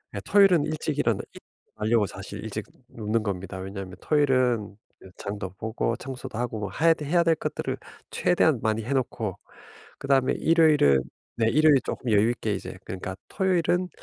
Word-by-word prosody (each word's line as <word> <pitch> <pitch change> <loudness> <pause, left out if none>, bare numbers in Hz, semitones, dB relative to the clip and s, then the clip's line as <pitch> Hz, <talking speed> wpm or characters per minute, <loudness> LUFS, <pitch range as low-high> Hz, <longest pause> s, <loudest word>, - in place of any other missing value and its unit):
예 100 - -2
토요일은 195 - +5
일찍 155 -1 -3
일어나려고 110 -1 -1
사실 - - -8
일찍 - - -5 0.2
눕는 110 0 -2
겁니다. 95 -2 -4
왜냐하면 95 -1 -7
토요일은 130 -8 +2 0.4
장도 100 -2 -5
보고 110 +1 -1
청소도 130 -4 -7
하고 110 -4 -3
해야 165 +1 +4
될 150 -3 -7
해야 170 0 +4
될 165 -1 +3
것들을 - - -3 0.3
최대한 115 - +2
많이 110 0 0
해놓고 115 -6 -2 0.6
그다음에 135 -2 +2
일요일은 150 - +4 0.3
네. 115 -1 +2
일요일 150 +2 +5
쪼끔 120 - -3
여유 105 +2 +4
있게 110 -3 -2
이제 95 - -7
그러니까 95 +1 -5
토요일은 180 -1 +1
120 Hz, 355 characters per minute, -26 LUFS, 105-155 Hz, 0.6 s, 토요일은